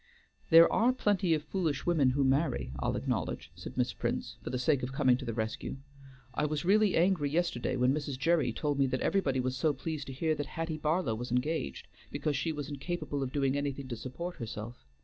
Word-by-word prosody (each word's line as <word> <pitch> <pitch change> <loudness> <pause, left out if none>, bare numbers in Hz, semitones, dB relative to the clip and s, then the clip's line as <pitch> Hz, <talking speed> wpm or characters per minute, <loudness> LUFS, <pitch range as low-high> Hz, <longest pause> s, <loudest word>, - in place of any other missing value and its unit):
"There 165 0 +9
are 235 +3 +4
plenty 200 -8 +2
of 150 - -3
foolish 160 -4 -1
women 160 -7 +4
who 140 +2 +1
marry, 135 - +1
I'll - - 0
acknowledge," - - -2
said - - -9
Miss 125 -1 +1
Prince, 120 -1 -3
for - - -5
the 125 - -1
sake 140 +1 +2
of 125 - -3
coming 130 -2 +3
to 130 - -7
the 115 - -2
rescue. 110 +3 -3 0.6
"I 150 - 0
was 150 +2 -2
really 210 +1 +4
angry 170 -4 +3
yesterday, 150 -6 0
when 125 +1 +3
Mrs. 145 -2 -3
Gerry 155 -2 +2
told 145 +4 -1
me 135 - +4
that 130 0 -2
everybody 140 -10 +1
was 130 0 -1
so 150 +3 +2
pleased 150 +1 -5
to 135 - -6
hear 155 +4 0
that 145 -2 -3
Hattie 165 -2 -4
Barlow 155 -5 +1
was 120 +3 -5
engaged, 125 - -1 0.2
because 150 -2 -1
she 160 +5 0
was 145 -2 -4
incapable 145 0 -3
of 130 -2 -2
doing 135 -1 +1
anything 140 -1 -2
to 120 - -3
support 170 +10 -6
herself. 115 - -7
145 Hz, 210 wpm, -31 LUFS, 130-165 Hz, 0.6 s, There